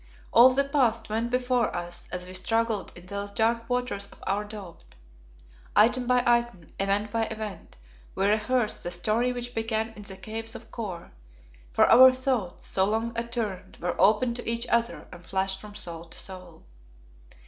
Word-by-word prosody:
All 240 +2 +9
the 265 +2 +2
past 250 -6 +1
went 225 +2 0
before 250 -3 +1
us 175 0 -5
as 180 0 -4
we 185 - -9
struggled 225 +2 0
in 175 - -12
those 200 +2 -5
dark 230 +2 0
waters 245 -5 -1
of - - -15
our 200 +2 0
doubt. 195 - -11 0.8
Item 240 +4 +4
by 250 0 +3
item, 235 -8 +1
event 200 +2 0
by 225 0 +1
event, 215 - -7 0.4
we 195 - +1
rehearsed 215 +3 +1
the - - -4
story 215 +8 +1
which 245 0 -5
began 225 0 -1
in 225 -2 -12
the 195 -2 -9
Caves 225 +4 -5
of 230 - -11
Kôr, 190 -7 -6 0.6
for - - +5
our 260 +1 +9
thoughts, 255 -8 -2
so 190 - +1
long 225 +3 -1
attuned, 230 -5 -4
were 175 +1 -2
open 220 +4 +4
to 240 -1 -5
each 235 +1 -1
other 235 0 0
and 180 -1 -11
flashed 190 +1 -1
from 210 -1 -11
soul 170 -5 -6
to 165 - -8
soul. 180 -3 -8
220 Hz, 170 wpm, -27 LUFS, 190-235 Hz, 0.8 s, All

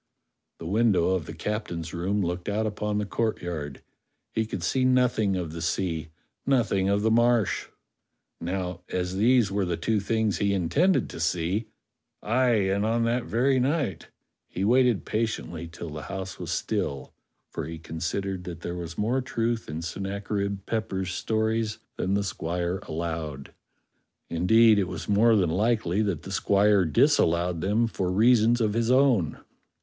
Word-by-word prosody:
The 80 - -9
window 100 -2 +2
of 95 -4 -1
the - - -6
captain's 85 -6 -4
room 95 +4 0
looked 90 +2 -3
out 105 +2 0
upon 105 0 -2
the 105 - -1
courtyard; 85 -10 -3 0.5
he 110 -1 0
could 95 -5 -5
see 130 +10 +1
nothing 125 -6 +2
of 90 -4 -3
the 85 +1 -6
sea, 80 -1 -1 0.4
nothing 110 -8 +2
of 100 +1 +1
the 110 - +3
Marsh. 120 -2 +2 0.7
Now, 90 0 -3
as 90 0 -2
these 115 -1 +4
were 100 0 0
the 90 -2 -1
two 110 +5 0
things 110 0 0
he 100 -1 +2
intended 140 - +2
to - - -8
see 90 +6 0 0.3
— - - -57 0.2
aye, 120 -1 +2
and 100 +1 +1
on 115 +2 +1
that 120 +1 0
very 130 +3 +2
night 135 - -1 0.2
— - - -56
he 95 - -1
waited 125 -2 +3
patiently 105 -7 -3
till 85 0 -8
the 75 0 -6
house 95 +2 -6
was 90 -3 -6
still; 85 -7 -2 0.4
for - - -4
he 80 0 -6
con 80 0 -8
sidered 95 +2 -2
that 85 -2 -7
there 85 - -4
was 85 -1 -6
more 120 +6 +1
truth 115 - -2
in 80 +2 -4
Sennacherib 100 +2 -3
Pepper's 95 -5 -2
stories 110 0 -1 0.2
than 95 +2 0
the 100 - +1
squire 90 0 -2
allowed. 80 -4 -4 0.8
Indeed, 110 +6 +5
it 95 - 0
was - - -6
more 110 +3 +4
than 90 -6 +2
likely 105 0 +1
that 100 -7 -1
the 95 - -8
squire 100 -1 +3
disallowed 85 +2 +2
them 105 +5 +2
for 95 -5 -2
reasons 115 +3 +4
of 105 -2 +1
his 115 +1 0
own. 125 - +3
100 Hz, 165 wpm, -26 LUFS, 85-115 Hz, 0.8 s, Indeed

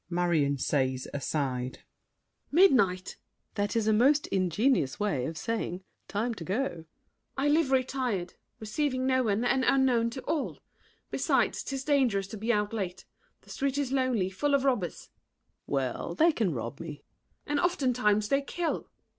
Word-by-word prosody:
MARION 170 -5 +1 0.6
(aside). 130 -3 -2 0.7
Midnight! 265 - +5
SAVERNY. 185 - -15
That 205 0 -1
is 225 -2 +1
a 220 - +4
most 275 +7 +4
ingenious 190 - +1
way 190 -12 0
Of 160 - -6
saying, 190 -1 -3 0.2
"Time 225 +4 -1
to 185 - -8
go." 190 +8 -1
MARION. 170 -11 -6 0.5
I 275 +2 +1
live 300 -1 +3
retired, 255 -8 0 0.3
Receiving 255 +4 -1
no 260 0 +3
one, 220 0 0
and 260 +1 +2
unknown 255 -4 +3
to 260 +3 -7
all. 305 -4 -2 0.5
Besides, - - +1
'tis 270 -1 -4
dangerous 260 -9 +2
to 220 - -6
be 225 +3 0
out 210 -1 0
late: 190 -4 -4 0.4
The - - -15
street 275 0 -1
is 280 -3 -1
lonely, 255 -8 +1
full 285 +8 +1
of 275 - +1
robbers. 245 - 0
SAVERNY. - - -21 0.5
Well, 135 +4 -2
They 330 - +5
can 220 - 0
rob 120 0 -5
me. 165 - -6
MARION. 145 -2 -8 0.4
And 295 0 0
oftentimes 250 - +1
they 275 0 +3
kill! 335 +4 -2
SAVERNY. - - -40
225 Hz, 165 wpm, -29 LUFS, 180-270 Hz, 0.7 s, Midnight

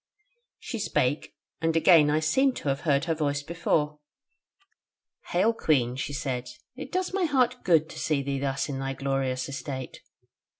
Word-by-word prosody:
She 230 - -6
spake, 145 -7 -1 0.3
and 165 0 +1
again 165 -2 +6
I 155 +1 +2
seemed 265 - +2
to 145 - -3
have 135 0 0
heard 140 +1 +3
her 165 - +1
voice 145 -2 -1
before: 150 -2 -1 1.3
'Hail, 200 +6 +2
Queen,' 130 - +1
she 135 - -4
said, 125 -3 -3 0.3
'it - - -8
does 370 0 -1
my 380 -2 +1
heart 255 -4 +1
good 160 -3 +4
to - - -8
see 145 -3 0
thee 140 0 -2
thus 135 0 -1
in 135 -2 -4
thy 135 0 -2
glorious 135 -1 -1
estate.' 135 -2 -6
150 Hz, 165 wpm, -27 LUFS, 135-170 Hz, 1.3 s, again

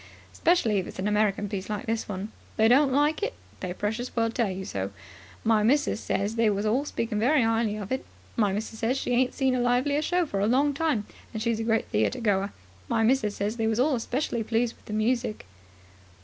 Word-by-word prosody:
Specially 235 - +2
if 185 - -4
it's - - -9
an 190 +2 -1
American 210 -1 +1
piece 195 -1 -5
like 215 +5 -3
this 225 -2 -2
one. 200 +2 -4 0.2
If - - -27
they 220 - +5
don't 270 +4 +5
like 295 +6 +2
it, 440 +4 -2 0.2
they 185 - -4
precious 215 +6 -2
soon 230 -2 0
let - - -7 0.2
you 190 - -5
know. 95 0 -2 0.5
My 220 -1 +3
missus 275 +2 +2
ses 205 +2 -1
they 225 -1 +4
was 205 0 -1
all 245 +7 +1
speakin' 230 -6 -2
very 260 +4 +4
'ighly 225 -2 +1
of 205 +1 -7
it. 260 - -1 0.3
My 210 -5 +2
missus 220 +2 -4
says 240 +4 +1
she 260 - -2
ain't 250 +1 +2
seen 265 -2 +2
a 255 - +1
livelier 250 +4 +2
show 355 +3 +1
for 200 -10 -3
a 200 - +2
long 280 +5 +3
time, 280 -8 0 0.3
and - - -1
she's 230 0 0
a - - -1
great 225 0 0
theatregoer. 200 - +1 0.4
My 225 - +1
missus 225 -3 +2
says 210 +3 -2
they 225 -1 0
was 220 +1 0
all 265 -1 +3
specially 240 0 -2
pleased 230 +1 0
with - - -26
the 210 - -6
music." 225 - 0
225 Hz, 220 wpm, -27 LUFS, 210-255 Hz, 0.5 s, they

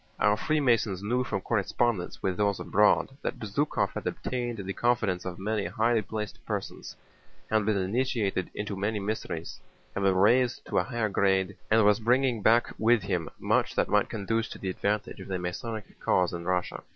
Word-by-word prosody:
Our 105 0 +4
Freemasons 115 -8 +1
knew 125 +5 +1
from 100 - -3
correspondence 110 -1 -1
with 95 -1 0
those 100 -1 +1
abroad 105 +6 +3
that - - -3
Bezúkhov 110 +8 -1
had - - -5
obtained 120 -2 -3
the 95 -1 -4
confidence 110 -7 0
of 90 -1 -5
many 105 +1 -1
highly 115 0 +2
placed 105 +1 -6
persons, 105 -4 -5 0.6
had 110 -1 +2
been 110 -2 +2
initiated 100 -1 0
into 105 -1 -3
many 105 +2 -1
mysteries, 100 -5 -4 0.3
had 100 - -3
been 95 -1 +3
raised 120 +6 +3
to - - +1
a - - +1
higher 120 -4 -1
grade, 95 -1 +1
and 110 -1 +5
was 105 +1 +5
bringing 125 0 +2
back 115 +3 +3
with 115 -1 +4
him 90 -5 -2
much - - +1
that - - +1
might - - +3
conduce 110 +2 -1
to - - -8
the 95 - -4
advantage 105 +3 -2
of - - -9
the 95 -1 -2
Masonic 105 +5 -5
cause 90 -1 +2
in 85 0 -5
Russia. 90 0 -1
105 Hz, 180 wpm, -28 LUFS, 95-115 Hz, 0.6 s, and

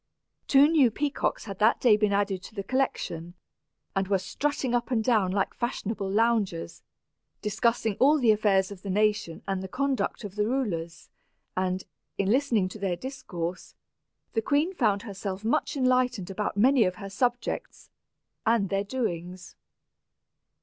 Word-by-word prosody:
Two 280 +1 +6
new 300 -6 +5
peacocks 285 +2 -2
had 195 -3 -7
that 215 +2 +4
day 235 -4 +5
been 210 -1 +1
added 200 -2 0
to 215 - -12
the 200 - -3
collection, 175 -9 -2 0.6
and 195 0 0
were 200 0 +3
strutting 265 +7 -2
up 240 -1 0
and 230 -4 +1
down 215 -6 +2
like 195 0 0
fashionable 215 -4 -3
loungers, 210 -5 0 0.6
discussing 215 0 0
all 290 +4 +5
the 240 -6 +4
affairs 205 -2 +2
of 195 -2 -9
the 200 - -6
nation 210 -4 0
and 195 -1 -1
the 190 - -5
conduct 260 -1 -1
of 200 -2 -7
the 210 0 +1
rulers; 190 -11 -3 0.4
and, 185 0 -1 0.3
in 195 0 +1
listening 245 -7 +2
to 200 +3 -9
their 190 -3 -1
discourse, 185 -8 -6 0.6
the 225 - +1
queen 290 +9 +1
found 215 - +1
herself 200 -1 -5
much 235 - 0
enlightened 250 -7 +1
about 205 +1 -3
many 255 +3 +5
of 185 -2 0
her 195 +2 -7
subjects, 245 +5 -2 0.5
and 225 -4 +2
their 195 0 0
doings. 185 -6 -4
210 Hz, 155 wpm, -27 LUFS, 190-245 Hz, 0.6 s, Two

